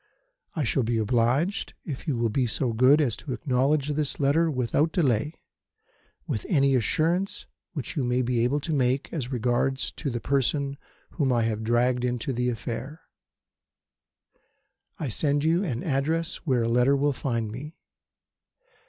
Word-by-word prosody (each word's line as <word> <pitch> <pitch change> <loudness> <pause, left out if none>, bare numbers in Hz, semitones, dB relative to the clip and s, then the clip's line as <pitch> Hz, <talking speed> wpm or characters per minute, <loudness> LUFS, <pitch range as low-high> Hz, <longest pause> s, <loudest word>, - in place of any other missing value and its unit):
I 155 - 0
shall 130 +2 +1
be 115 0 0
obliged 120 - +1
if 145 -1 -6
you 140 -5 0
will 115 -1 0
be 125 +2 +1
so 120 +1 -1
good 130 +6 +5
as 130 -8 +2
to 140 - -5
acknowledge 140 +2 +1
this 150 -1 -1
letter 155 +4 +3
without 140 +3 +1
delay, 150 - +1 0.9
with 105 - -3
any 140 -5 +3
assurance 170 - 0 0.3
which 145 -2 -5
you 145 - 0
may 125 +1 +1
be 120 -1 +1
able 135 +5 +1
to 160 +2 -3
make 130 -1 0
as 135 -6 -3
regards 125 +2 0
the 130 -6 -3
person 140 +2 0 0.3
whom 140 -5 0
I 120 -2 +2
have 110 -1 -1
dragged 120 +2 +2
into 125 +1 -1
the 125 +1 0
affair. 120 +5 -5 2.0
I 155 - -3
send 145 +4 +1
you 165 +4 +2
an 125 - -3
address 160 +4 0
where 125 -4 +2
a - - 0
letter 125 +4 +3
will 145 +1 +1
find 115 -5 -2
me. 145 +8 -8
130 Hz, 155 wpm, -26 LUFS, 120-150 Hz, 2.0 s, good